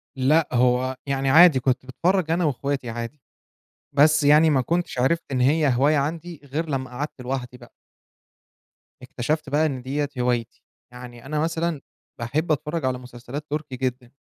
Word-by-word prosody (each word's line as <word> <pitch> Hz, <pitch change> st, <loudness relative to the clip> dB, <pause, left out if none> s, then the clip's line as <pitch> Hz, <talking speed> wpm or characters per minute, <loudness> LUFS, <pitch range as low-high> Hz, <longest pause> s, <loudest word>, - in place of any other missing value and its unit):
لأ 145 Hz, +5 st, +3 dB
هو 125 Hz, +1 st, +2 dB
يعني 135 Hz, -1 st, -1 dB
عادي، 160 Hz, -2 st, +7 dB
كنت 130 Hz, 0 st, 0 dB
باتفرج 170 Hz, +5 st, 0 dB
أنا 170 Hz, 0 st, +1 dB
وإخواتي 140 Hz, -3 st, -2 dB
عادي، 120 Hz, +5 st, -6 dB, 0.7 s
بس 150 Hz, +1 st, +4 dB
يعني 150 Hz, +2 st, +6 dB
ما 135 Hz, -3 st, +3 dB
كنتش 170 Hz, -2 st, -2 dB
عرفت 165 Hz, +7 st, +1 dB
إن 130 Hz, -1 st, 0 dB
هي 150 Hz, +3 st, +3 dB
هواية 145 Hz, +4 st, +3 dB
عندي، 160 Hz, +2 st, -3 dB
غير 155 Hz, +4 st, -4 dB
لما 130 Hz, -2 st, -2 dB
قعدت 135 Hz, +1 st, -6 dB
لوحدي 125 Hz, -1 st, -4 dB
بقى. 120 Hz, -1 st, -16 dB, 1.3 s
اكتشفت 140 Hz, +4 st, -3 dB
بقى 150 Hz, +3 st, +2 dB
إن 135 Hz, -4 st, -2 dB
ديّة 140 Hz, +3 st, -2 dB
هوايتي، 120 Hz, -2 st, -1 dB, 0.3 s
يعني 125 Hz, 0 st, -11 dB
أنا 150 Hz, +1 st, -2 dB
مثلًا 165 Hz, -2 st, -1 dB, 0.4 s
باحب 150 Hz, +8 st, -1 dB
أتفرج 150 Hz, 0 st, -1 dB
على 130 Hz, -1 st, 0 dB
مسلسلات 125 Hz, +4 st, -8 dB
تركي 150 Hz, -3 st, -4 dB
جدًا. 125 Hz, -1 st, -3 dB
140 Hz, 155 wpm, -23 LUFS, 125-155 Hz, 1.3 s, عادي